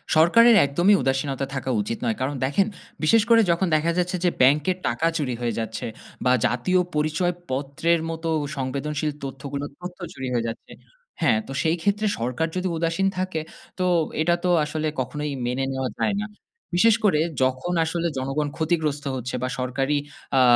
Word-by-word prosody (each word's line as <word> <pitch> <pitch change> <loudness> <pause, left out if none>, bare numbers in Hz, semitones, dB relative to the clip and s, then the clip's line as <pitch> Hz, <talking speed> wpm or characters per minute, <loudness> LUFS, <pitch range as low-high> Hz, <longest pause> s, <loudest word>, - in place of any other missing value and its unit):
সরকারের 230 +9 +7
একদমই 175 +9 +4
উদাসীনতা 135 0 0
থাকা 135 0 -3
উচিত 110 +3 -3
নয়। 110 - 0
কারণ 135 +2 -1
দেখেন, 145 +9 +2 0.4
বিশেষ 225 +9 +5
করে 230 -1 +7
যখন 170 +3 +1
দেখা 155 +2 +2
যাচ্ছে 180 +1 0
যে - - +5
ব্যাংকের 150 +7 +4
টাকা 125 +7 0
চুরি 130 -5 -1
হয়ে 120 -1 -1
যাচ্ছে 110 -1 -4 0.4
বা, 125 - +5
জাতীয় 180 +10 +2 0.2
পরিচয় 155 +4 +1 0.2
পত্রের 145 +5 0
মতো 165 0 -4
ও - - -3
সংবেদনশীল 140 +3 -2
তথ্যগুলো 140 +1 -5
তথ্য 180 +1 -8
চুরি 130 - -5
হয়ে 120 -1 0
যাচ্ছে। 115 - -7 0.5
হ্যাঁ, 130 -9 +4
তো - - -7
সেইক্ষেত্রে 200 +6 +1
সরকার 125 +7 -1
যদি 185 0 -1
উদাসীন 165 +4 +1
থাকে, 185 -3 -1 0.4
তো 185 - +1 0.4
এটা 170 +2 +3
তো 180 - +1 0.2
আসলে 155 +1 -2
কখনোই 150 +3 -3
মেনে 125 +2 -1
নেওয়া 130 -1 -2
যায় 205 - +1
না। 215 - -4 0.5
বিশেষ 225 +4 +5
করে 190 -8 +4 0.2
যখন 130 +7 0
আসলে 170 +1 -1
জনগণ 135 +3 -1
ক্ষতিগ্রস্ত 155 -3 0
হচ্ছে 125 0 -4
বা, - - +1
সরকারি 135 +3 0 0.4
আ - - +6
150 Hz, 165 wpm, -24 LUFS, 130-175 Hz, 0.5 s, সরকারের